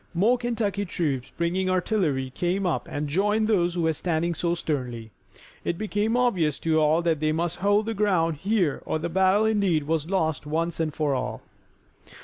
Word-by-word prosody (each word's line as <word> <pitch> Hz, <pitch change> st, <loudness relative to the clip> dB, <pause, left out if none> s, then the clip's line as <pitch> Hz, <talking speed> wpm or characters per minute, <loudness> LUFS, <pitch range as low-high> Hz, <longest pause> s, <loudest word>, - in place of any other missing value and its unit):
More 215 Hz, +8 st, +4 dB
Kentucky 220 Hz, -5 st, -1 dB
troops 150 Hz, -9 st, -2 dB
bringing 180 Hz, +3 st, 0 dB
artillery 175 Hz, -, 0 dB
came 180 Hz, +7 st, -1 dB
up 175 Hz, -, -1 dB
and 145 Hz, +1 st, -3 dB
joined 210 Hz, +7 st, +1 dB
those 175 Hz, -5 st, +2 dB
who 175 Hz, -, 0 dB
were 160 Hz, 0 st, +2 dB
standing 170 Hz, +1 st, -1 dB
so 170 Hz, +1 st, -1 dB
sternly. 125 Hz, -9 st, -4 dB, 0.5 s
It 170 Hz, -, -2 dB
became 215 Hz, +3 st, 0 dB
obvious 185 Hz, -, +1 dB
to 160 Hz, -1 st, +2 dB
all 155 Hz, +2 st, +3 dB
that 165 Hz, -3 st, +1 dB
they 155 Hz, 0 st, +1 dB
must 170 Hz, +2 st, -1 dB
hold 205 Hz, +3 st, +2 dB
the 225 Hz, -, -2 dB
ground 180 Hz, -7 st, +1 dB
here 190 Hz, -3 st, 0 dB
or -, -, 0 dB
the 165 Hz, +2 st, -3 dB
battle 190 Hz, +4 st, +3 dB
indeed 200 Hz, -8 st, +2 dB
was 160 Hz, +1 st, -1 dB
lost 160 Hz, -6 st, -1 dB
once 165 Hz, +2 st, -1 dB
and 160 Hz, -1 st, 0 dB
for 150 Hz, -1 st, 0 dB
all. 130 Hz, -1 st, -3 dB
170 Hz, 180 wpm, -25 LUFS, 155-200 Hz, 0.5 s, More